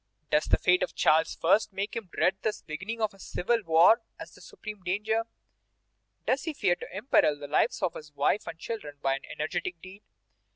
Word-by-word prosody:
Does 150 - +3
the - - +3
fate 180 0 +3
of - - -2
Charles 160 +1 +3
I. 180 +5 +6
make 195 +1 -4
him 220 -5 -5
dread 190 +1 +2
the 215 - -1
beginning 190 +9 -5
of 215 -2 0
civil 230 +6 0
war 170 +7 +6 0.2
as - - -9
the - - -16
supreme 210 -2 -9
danger? 215 +5 -1 1.0
Does 265 +3 +1
he 320 - -2
fear 190 -10 +2
to - - -8
imperil 195 - +3
the 145 0 -8
lives 145 - +1
of 175 - +1
his 150 -1 -10
wife 145 +9 +1
and 165 - -6
children 165 -6 -6
by 135 0 +2
an 140 - -12
energetic 165 +3 -3
deed? 190 +3 -12
185 Hz, 195 wpm, -28 LUFS, 155-215 Hz, 1.0 s, I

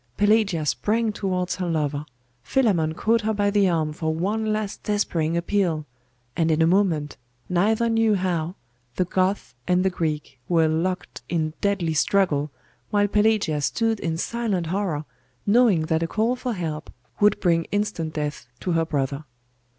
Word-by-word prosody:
Pelagia 205 -6 +3
sprang 220 +8 +1
towards 185 -3 -2
her 180 -2 -2
lover: 150 -2 -1 0.4
Philammon 175 - +1
caught 230 +5 +2
her 220 0 -1
by 205 0 +1
the 200 -2 +3
arm 155 -3 0
for 160 +1 -2
one 210 +7 -1
last 215 -1 -3
despairing 170 -6 0
appeal: 170 -4 0 0.5
and 165 -1 +1
in 155 0 +2
a 160 - +5
moment, 165 -5 +1 0.3
neither 215 +6 +2
knew 225 -2 +3
how, 180 -2 -1 0.4
the 185 - +1
Goth 185 +3 0
and 180 +1 +2
the 190 - +3
Greek 150 -6 -3
were 165 -2 +4
locked 180 +4 -2
in 155 -2 -1
deadly 195 -5 +1
struggle, 155 -3 +2 0.4
while 205 -1 +2
Pelagia 210 -7 +2
stood 225 +8 0
in 165 -1 -2
silent 210 -3 -1
horror, 170 -4 -2 0.4
knowing 210 -5 +4
that 160 +1 0
a 165 - 0
call 225 +7 +1
for 250 -1 -3
help 160 -5 -4 0.3
would 210 0 +4
bring 165 -2 +2
instant 205 -6 -2
death 150 -5 -3
to 180 - -1
her 165 -1 +2
brother. 140 -1 -2
180 Hz, 160 wpm, -24 LUFS, 160-205 Hz, 0.5 s, a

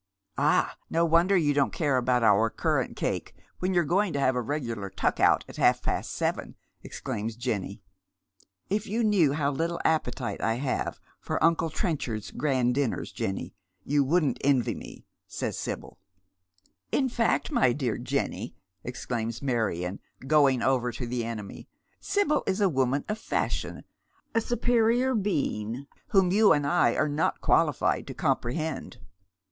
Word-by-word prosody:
" - - -54
Ah, - - +2
no 165 +1 +2
wonder 170 +4 +4
you 150 -4 +2
don't 140 -1 +2
care 145 -5 0
about 125 -1 +2
our 110 +1 +4
currant - - -1
cake - - -3 0.2
when 185 +1 0
you're 175 -2 +3
going 185 +4 +1
to 140 - -1
have 130 -2 +2
a 125 - 0
regular 115 -6 -3
tuck 95 - -1
out - - +4
at - - -11
half - - +3
past - - -2
seven," - - -2 0.3
ex - - -8
claims 110 +2 -3
Jenny. 110 -5 -3 0.4
" 90 -2 -36
If 215 - -8
you 225 +4 0
laiew 180 -10 +3
how 145 -2 +1
little 165 +4 -2
appetite 155 -5 0
I 115 - +1
have 130 +2 -2 0.2
for - - -2
uncle 165 0 +3
Trenchard's 135 - -3
grand 130 -4 +1
dinners, 135 -3 -1
Jenny, 95 -2 -4 0.3
you 145 +4 +2
wouldn't 155 +1 +1
envy 135 -3 +2
me," - - -10 0.2
says - - -3
Sibyl. - - -6 0.5
" 90 +1 -40
In 270 - +2
fact, 230 - 0
my 130 - +4
dear 120 -3 -2
Jenny," - - -3 0.3
exclaims 120 -2 -4
IVIarion, 110 -9 -1 0.3
going 140 -4 +4
over 125 -2 +1
to 120 - -5
the 120 0 -2
enemy, 110 -3 -7 0.2
" - - -41
Sibyl 400 -7 +1
is 190 +1 0
a 200 - +4
woman 135 -1 0
of 210 +1 -3
fashion, - - -2 0.5
a 230 - +2
superior 240 +2 +2
being 140 - -1 0.2
whom 190 -3 +3
you 210 0 +6
and 145 -2 0
I 175 +5 +3
are 155 - +2
not 150 +2 0
qualified - - +2
to - - -7
comprehend." 155 +6 -2
140 Hz, 165 wpm, -27 LUFS, 120-175 Hz, 0.5 s, you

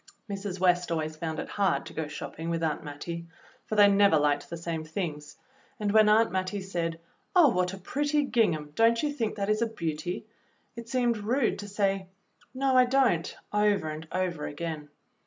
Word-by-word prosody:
Mrs. 195 -2 -5
West 180 -1 +2
always 155 -1 -2
found 160 0 -4
it - - -4
hard 195 -3 0
to - - -9
go 160 -2 -3
shopping 150 +2 -6
with 165 0 -1
Aunt 155 -2 -1
Mattie, 170 +3 -6 0.4
for 215 - -2
they 205 -1 +8
never 200 -4 +5
hked 145 -1 +1
the 170 - -5
same 165 -1 -4
things, 155 -3 -5 0.4
and 210 -1 0
when 215 0 +6
Aunt 220 0 +4
Mattie 190 +2 -2
said, 170 -3 -3 0.4
"Oh, 340 -5 +7
what 180 -4 +1
a 195 - -7
pretty 290 +9 0
gingham; 185 - +1
don't 230 - +3
you 295 -1 0
think 225 -7 -2
that 200 -1 -2
is 215 +1 +1
a 235 - +2
beauty?" 170 -4 -4 0.5
it 235 0 -9
seemed 240 -2 +1
rude 235 +4 0
to 205 - -6
say, 195 -2 0 0.4
"No, 265 0 +1
I 255 0 +7
don't," 250 -10 +1 0.2
over 210 -5 +2
and 155 +1 -7
over 180 -5 -2
again. 155 -1 -5
190 Hz, 190 wpm, -28 LUFS, 165-220 Hz, 0.5 s, they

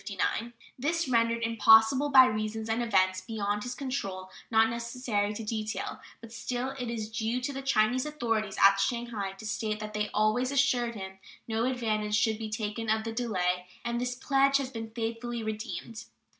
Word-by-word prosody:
This 330 +5 0
was - - -7
rendered 230 0 +2
impossible 225 +4 +5
by 260 -2 +9
reasons 215 0 -2
and 225 +2 +1
events 185 -5 +2
beyond 210 -2 -2
his 245 +3 -5
control, 195 -9 -4 0.2
not 225 0 +5
necessary 235 -3 -2
to 225 - -5
detail; 215 0 -3 0.2
but 230 0 -11
still 245 +2 -3
it 250 -3 -5
is 225 -2 -3
due 225 +2 -1
to 280 +3 -3
the 270 - -4
Chinese 255 -1 +2
authorities 225 -8 -2
at 195 0 +6
Shanghai 230 -4 -2
to 195 +3 -11
state 215 -1 -2
that 215 0 -6
they 210 0 -1
always 215 +4 +2
assured 250 -4 +2
him 190 -1 -8 0.3
no 225 +1 0
advantage 215 -4 0
should 220 0 +2
be 220 -1 -4
taken 215 +1 -3
of 220 0 +2
the 225 - -4
delay, 180 -6 -1 0.2
and 235 0 -1
this 250 0 -2
pledge 275 +1 +3
has 270 -2 -4
been 225 -3 -6
faithfully 230 +1 -4
redeemed. 220 0 -5
225 Hz, 175 wpm, -29 LUFS, 215-245 Hz, 0.3 s, by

